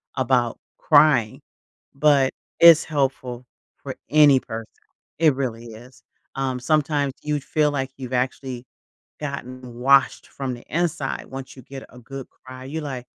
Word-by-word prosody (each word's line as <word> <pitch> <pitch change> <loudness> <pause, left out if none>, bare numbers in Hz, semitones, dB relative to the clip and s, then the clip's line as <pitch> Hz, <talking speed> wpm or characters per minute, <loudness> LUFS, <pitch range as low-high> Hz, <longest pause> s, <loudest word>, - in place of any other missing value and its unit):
about 125 -2 +1 0.2
crying, 125 -8 +3 0.5
but 140 -2 +3 0.3
it's 170 -1 +8
helpful 130 -4 -2 0.4
for - - -6
any 145 -3 +6
person, 115 -2 -7 0.5
it 155 -4 +4
really 120 -4 -4
is. 120 +4 -15 0.3
Um, 130 -2 -2
sometimes 145 0 0
you'd 150 -2 -2
feel 150 +1 +1
like 135 -2 -2
you've 130 -1 -7
actually 130 0 -3 0.6
gotten 130 -4 -7
washed 135 +3 +3
from 135 -2 -5
the 120 - -12
inside 165 -5 -2
once 135 0 -8
you 130 - -12
get 135 +2 -10
a 125 - -15
good 135 +2 -9
cry, 130 0 -12
you're 155 +4 -5
like, 130 -4 -5
135 Hz, 140 wpm, -23 LUFS, 125-145 Hz, 0.6 s, it's